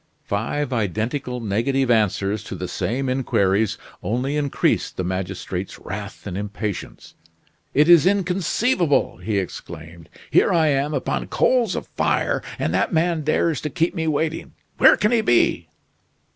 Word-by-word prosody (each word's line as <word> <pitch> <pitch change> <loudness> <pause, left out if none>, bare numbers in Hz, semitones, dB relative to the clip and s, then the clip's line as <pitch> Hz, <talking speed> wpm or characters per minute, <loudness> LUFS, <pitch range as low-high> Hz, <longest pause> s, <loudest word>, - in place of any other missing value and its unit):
Five 125 +7 -2
identical 115 - -2
negative 120 +5 0
answers 105 -2 +1
to - - -6
the - - -5
same 135 +3 -2
inquiries 110 -5 +1 0.2
only 125 +6 -1
increased 145 -2 0
the 95 - -1
magistrate's 95 0 -4
wrath 100 +1 -7
and 95 -3 -5
impatience. 105 0 -5 0.6
"It 150 +2 +5
is 170 -1 +7
inconceivable!" 185 - +1
he 110 -2 -2
exclaimed. 85 -3 -7 0.2
"Here - - +4
I 160 -3 +3
am 145 +2 0
upon 135 - -2
coals 240 -7 +2
of - - -4
fire, - - 0 0.2
and 80 - -1
that 95 - +1
man 165 0 +1
dares 155 +1 +1
to 150 - -3
keep 165 +5 0
me 160 -3 -2
waiting. 160 +1 -2 0.3
Where - - +7
can 210 - +1
he 235 -2 +3
be?" 120 - +2
130 Hz, 145 wpm, -22 LUFS, 100-160 Hz, 0.6 s, is